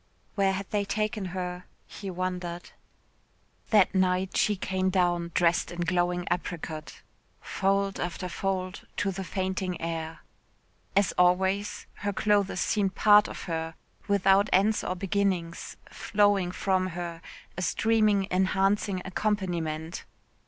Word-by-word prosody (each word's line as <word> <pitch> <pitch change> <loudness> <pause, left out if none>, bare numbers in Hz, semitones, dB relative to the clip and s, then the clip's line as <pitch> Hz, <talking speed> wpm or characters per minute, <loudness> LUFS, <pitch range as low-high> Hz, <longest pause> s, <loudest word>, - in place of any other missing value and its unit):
Where 195 -1 +2
had 195 0 -4
they 205 -1 +1
taken 210 0 -2
her? 180 0 -4 0.2
He 200 - -8
wondered. 180 -1 -4 1.0
That 210 -3 +5
night 185 0 +1
she 210 - +3
came 190 0 -1
down, 175 -2 +1
dressed 175 -1 +2
in 175 0 -5
glowing 175 +1 0
apricot 160 -3 -4 0.4
"fold 195 0 0
after 180 +1 -3
fold 185 +1 -3
to 200 - 0
the 195 +1 -5
fainting 185 -1 -2
air." 165 -1 -4 0.7
As 200 -2 +4
always, 190 +3 +2
her 205 0 -2
clothes 205 -2 +1
seemed 195 -2 0
part 210 0 +6
of - - -7
her, 165 -1 -3 0.3
without 200 0 +4
ends 205 +4 +3
or 185 - -2
beginnings, 185 -3 -1
flowing 205 -3 +2
from 185 0 0
her, 170 -1 -5 0.3
a 185 - -4
streaming 215 0 +2
enhancing 190 +1 +1
accompaniment. 175 -5 -2
185 Hz, 125 wpm, -28 LUFS, 175-200 Hz, 1.0 s, part